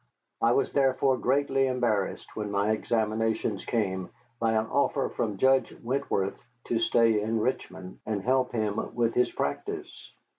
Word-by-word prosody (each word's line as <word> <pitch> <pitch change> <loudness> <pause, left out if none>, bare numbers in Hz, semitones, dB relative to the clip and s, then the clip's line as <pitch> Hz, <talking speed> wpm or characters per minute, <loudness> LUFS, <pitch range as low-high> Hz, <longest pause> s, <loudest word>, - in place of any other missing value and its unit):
I 115 +1 +4
was - - +1
therefore 135 -1 +3
greatly 135 +1 +2
embarrassed, 120 -6 -1
when 105 -1 -3
my 100 +1 +1
examinations 110 -1 0
came, 95 -5 -1 0.3
by 115 -1 +2
an 110 0 +2
offer 140 +3 +1
from 105 -4 -2
Judge 130 +4 +3
Wentworth 120 -6 -1 0.2
to 115 - -1
stay 115 -2 +3
in 110 +2 0
Richmond 95 -6 -3
and 105 -3 -3
help 130 +1 +2
him 110 -2 -2
with 115 -1 +1
his 125 - +2
practice. 70 - -4
115 Hz, 145 wpm, -28 LUFS, 105-130 Hz, 0.3 s, I